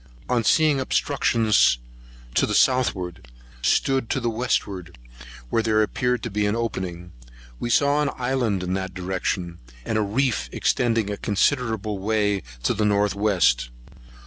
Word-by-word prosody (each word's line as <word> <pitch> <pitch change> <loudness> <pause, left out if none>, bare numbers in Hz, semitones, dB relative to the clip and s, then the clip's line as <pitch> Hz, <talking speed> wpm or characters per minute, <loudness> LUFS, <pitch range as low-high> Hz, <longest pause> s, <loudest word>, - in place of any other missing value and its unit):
On 120 -2 +1
seeing 155 +3 +3
obstruction 115 -3 0 0.9
to - - +3
the - - -1
southward, 95 - +1 0.3
stood 130 - +1
to - - 0
the 120 -2 -1
westward, 100 - -2 0.5
where 115 - +2
there 110 -1 +2
appeared 125 +3 -1
to 115 - -4
be 105 +1 0
an 105 - 0
opening. 90 -7 -4 0.5
We 120 - -3
saw 145 +4 +3
an 145 - +1
island 125 -7 0
in 90 0 -2
that 95 -1 -4
direction, 90 -1 -3 0.3
and 110 - 0
a - - +2
reef 105 - 0
extending 115 -4 +1
a 100 - -4
considerable 110 -2 0
way 105 -1 0 0.2
to - - +2
the 105 - -1
north 105 -1 +2
west. 90 - +2
105 Hz, 145 wpm, -23 LUFS, 95-125 Hz, 0.9 s, seeing